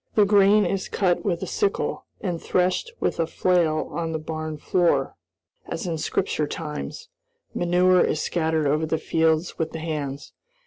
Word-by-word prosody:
The 210 - +6
grain 200 0 +5
is 190 +2 -2
cut 180 -3 +1
with 175 -4 -1
a - - -1
sickle 410 -2 -1
and 175 -4 -3
threshed 185 - 0
with - - -1
a 165 - +1
flail 165 -3 +1
on 165 -1 -3
the - - 0
barn 155 0 -5
floor, 175 +3 +1 0.5
as - - -4
in 165 -3 -2
Scripture 150 0 -1
times. 150 - -6 0.4
Manure 180 +1 +3
is 155 - 0
scattered 160 -2 0
over 155 +3 +1
the 160 - 0
fields 160 +1 +1
with 160 -1 -2
the 160 - -4
hands. 150 -3 -4
165 Hz, 165 wpm, -24 LUFS, 155-180 Hz, 0.5 s, The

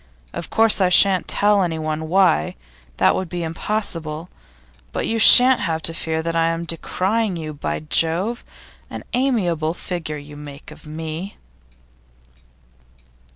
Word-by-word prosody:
Of 170 - -6
course 225 -2 +3
I 185 - +4
shan't 190 0 +4
tell 205 0 +2
anyone 160 -2 -2
why; 180 - +2 0.4
that - - +4
would 185 -2 -3
be 175 0 -4
impossible. 165 -2 -4 0.6
But - - -3
you 225 0 -1
shan't 250 +3 +8
have 160 -1 -2
to 165 - +1
fear 160 0 -3
that 165 0 -3
I 165 0 +2
am 165 0 -2
decrying 190 +5 -1
you. 155 -2 -6
By 145 - -4
Jove! 170 +9 0 0.5
an - - -7
amiable 180 - 0
figure 165 -5 -5
you 145 0 -11
make 145 -1 -11
of - - -14
me! 160 +4 -6
165 Hz, 140 wpm, -21 LUFS, 160-195 Hz, 0.6 s, shan't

